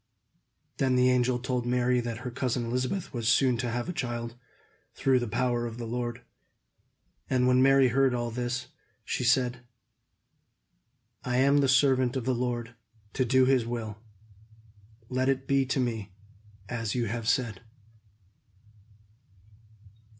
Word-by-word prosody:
Then 130 Hz, -1 st, +2 dB
the 125 Hz, 0 st, +4 dB
angel 125 Hz, 0 st, +2 dB
told 125 Hz, 0 st, -2 dB
Mary 125 Hz, 0 st, +2 dB
that 120 Hz, -1 st, -4 dB
her 125 Hz, -, -3 dB
cousin 120 Hz, 0 st, -2 dB
Elizabeth 125 Hz, +11 st, -2 dB
was 115 Hz, -3 st, -3 dB
soon 130 Hz, -1 st, +4 dB
to 120 Hz, +1 st, -2 dB
have 120 Hz, +3 st, -3 dB
a 180 Hz, -, -3 dB
child, 120 Hz, -5 st, -4 dB, 0.6 s
through 130 Hz, -1 st, +2 dB
the 120 Hz, -, -3 dB
power 120 Hz, +1 st, 0 dB
of 115 Hz, 0 st, -8 dB
the 120 Hz, -, -5 dB
Lord. 120 Hz, +1 st, -4 dB, 1.1 s
And 125 Hz, -1 st, +2 dB
when 125 Hz, 0 st, +4 dB
Mary 135 Hz, -1 st, +5 dB
heard 130 Hz, +1 st, +2 dB
all 120 Hz, -1 st, -2 dB
this, 120 Hz, +1 st, -3 dB, 0.4 s
she -, -, -2 dB
said: 125 Hz, 0 st, +2 dB, 1.6 s
"I 125 Hz, 0 st, -1 dB
am 140 Hz, +2 st, +4 dB
the 140 Hz, -, +3 dB
servant 130 Hz, -1 st, +3 dB
of 130 Hz, -3 st, -2 dB
the 130 Hz, -, +1 dB
Lord, 120 Hz, -1 st, -3 dB, 0.4 s
to 130 Hz, -, +1 dB
do 130 Hz, +2 st, +4 dB
his 130 Hz, -2 st, +3 dB
will. 110 Hz, -3 st, -5 dB, 1.1 s
Let 130 Hz, +2 st, 0 dB
it 135 Hz, 0 st, 0 dB
be 135 Hz, -1 st, +2 dB
to 135 Hz, -, 0 dB
me 110 Hz, -6 st, -3 dB, 0.5 s
as 115 Hz, -1 st, -3 dB
you 120 Hz, -2 st, 0 dB
have 115 Hz, +1 st, -2 dB
said." 125 Hz, -6 st, 0 dB
125 Hz, 145 wpm, -28 LUFS, 120-130 Hz, 1.6 s, Mary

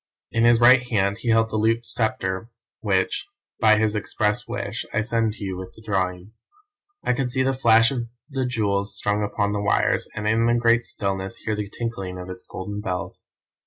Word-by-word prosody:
In 115 Hz, 0 st, +2 dB
his 120 Hz, -1 st, +6 dB
right 125 Hz, +1 st, +7 dB
hand 100 Hz, -2 st, +1 dB
he 120 Hz, -, -3 dB
held 115 Hz, 0 st, +3 dB
the 110 Hz, -, -1 dB
looped 115 Hz, +2 st, +1 dB
sceptre 110 Hz, -3 st, -1 dB, 0.3 s
which, 95 Hz, -, 0 dB, 0.3 s
by 110 Hz, -1 st, +5 dB
his 110 Hz, 0 st, +1 dB
express 105 Hz, +2 st, -1 dB
wish 115 Hz, -2 st, -4 dB
I 105 Hz, -, +1 dB
send 115 Hz, -1 st, 0 dB
to 105 Hz, -, -9 dB
you 95 Hz, -2 st, -3 dB
with 95 Hz, 0 st, -8 dB
the 110 Hz, -, -15 dB
drawings. 95 Hz, 0 st, -3 dB, 0.6 s
I -, -, +2 dB
could 125 Hz, 0 st, -1 dB
see 130 Hz, +1 st, +1 dB
the 135 Hz, +1 st, +1 dB
flash 115 Hz, -1 st, +5 dB
of 120 Hz, -3 st, -3 dB, 0.2 s
the 135 Hz, -4 st, -2 dB
jewels 100 Hz, -4 st, -1 dB
strung 105 Hz, +1 st, 0 dB
upon 100 Hz, 0 st, -1 dB
the 100 Hz, -, -1 dB
wires, 105 Hz, -, +1 dB
and 105 Hz, 0 st, -3 dB
in 115 Hz, +2 st, +3 dB
the 120 Hz, -, +3 dB
great 115 Hz, 0 st, +3 dB
stillness, 95 Hz, -1 st, -3 dB
hear 110 Hz, -, -3 dB
the 105 Hz, -1 st, -4 dB
tinkling 95 Hz, -6 st, -5 dB
of 90 Hz, 0 st, -7 dB
its 90 Hz, 0 st, -10 dB
golden 105 Hz, +2 st, -5 dB
bells. 90 Hz, -3 st, -4 dB
110 Hz, 200 wpm, -24 LUFS, 100-115 Hz, 0.6 s, right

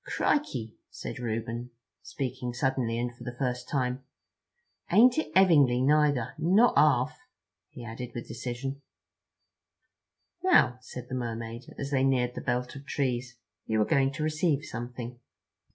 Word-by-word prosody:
"Crikey," 125 Hz, -, 0 dB, 0.2 s
said -, -, -7 dB
Reuben, 115 Hz, +1 st, -3 dB, 0.3 s
speaking 125 Hz, +2 st, -4 dB
suddenly 130 Hz, -3 st, 0 dB
and 120 Hz, 0 st, -2 dB
for 120 Hz, -, -12 dB
the 120 Hz, 0 st, -6 dB
first 125 Hz, -2 st, -2 dB
time, 130 Hz, -2 st, -1 dB, 0.9 s
"ain't 245 Hz, +6 st, +6 dB
it -, -, -3 dB
'evingly 150 Hz, -10 st, +6 dB
neither. 145 Hz, -2 st, +3 dB
Not 190 Hz, +9 st, +5 dB
arf," 130 Hz, -5 st, +4 dB, 0.5 s
he 125 Hz, -5 st, -10 dB
added 120 Hz, +1 st, -7 dB
with 120 Hz, -, -5 dB
decision. 125 Hz, +4 st, -5 dB, 1.6 s
"Now," 130 Hz, -, +4 dB
said 125 Hz, -1 st, -9 dB
the -, -, -8 dB
Mermaid, 115 Hz, -1 st, -5 dB
as 140 Hz, +1 st, -4 dB
they 135 Hz, -2 st, +2 dB
neared 125 Hz, -2 st, +2 dB
the -, -, -6 dB
belt 125 Hz, 0 st, -2 dB
of 140 Hz, -, -9 dB
trees, 125 Hz, -3 st, -2 dB, 0.3 s
"you 110 Hz, 0 st, +1 dB
are 105 Hz, -, +4 dB
going 135 Hz, -1 st, +2 dB
to 155 Hz, -, -3 dB
receive 155 Hz, -1 st, +1 dB
something." 120 Hz, 0 st, -6 dB
125 Hz, 140 wpm, -28 LUFS, 120-140 Hz, 1.6 s, ain't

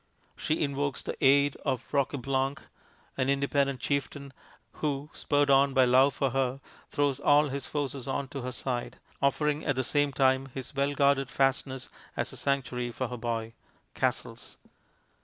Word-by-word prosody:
She 155 Hz, +1 st, -1 dB
invokes 140 Hz, -1 st, -2 dB
the -, -, -4 dB
aid 140 Hz, +1 st, +5 dB
of 130 Hz, -4 st, -2 dB
Roqueblanc, 135 Hz, -1 st, 0 dB, 0.6 s
an 130 Hz, 0 st, +1 dB
independent 140 Hz, -1 st, +1 dB
chieftain, 140 Hz, -1 st, -2 dB, 0.5 s
who, 145 Hz, 0 st, -2 dB
spurred 145 Hz, -1 st, +2 dB
on 135 Hz, 0 st, +4 dB
by 130 Hz, -1 st, +6 dB
love 130 Hz, +2 st, +5 dB
for 135 Hz, -2 st, 0 dB
her, 135 Hz, 0 st, 0 dB, 0.3 s
throws 145 Hz, -2 st, 0 dB
all 145 Hz, +1 st, +4 dB
his 140 Hz, 0 st, -4 dB
forces 140 Hz, -3 st, -3 dB
on 135 Hz, 0 st, -2 dB
to 140 Hz, -1 st, -5 dB
her 130 Hz, +1 st, -4 dB
side, 125 Hz, -1 st, -4 dB, 0.2 s
offering 150 Hz, +2 st, +1 dB
at -, -, 0 dB
the 130 Hz, -, 0 dB
same 145 Hz, +2 st, +2 dB
time 130 Hz, 0 st, +2 dB
his 130 Hz, -2 st, -6 dB
well 140 Hz, +1 st, 0 dB
guarded 140 Hz, -2 st, +3 dB
fastness 135 Hz, -1 st, 0 dB, 0.3 s
as -, -, -2 dB
a -, -, -8 dB
sanctuary 125 Hz, -3 st, -1 dB
for 125 Hz, +1 st, -4 dB
her 125 Hz, -, -5 dB
boy. 115 Hz, -1 st, -3 dB, 0.4 s
("Castles.") -, -, -3 dB
135 Hz, 160 wpm, -29 LUFS, 130-140 Hz, 0.6 s, by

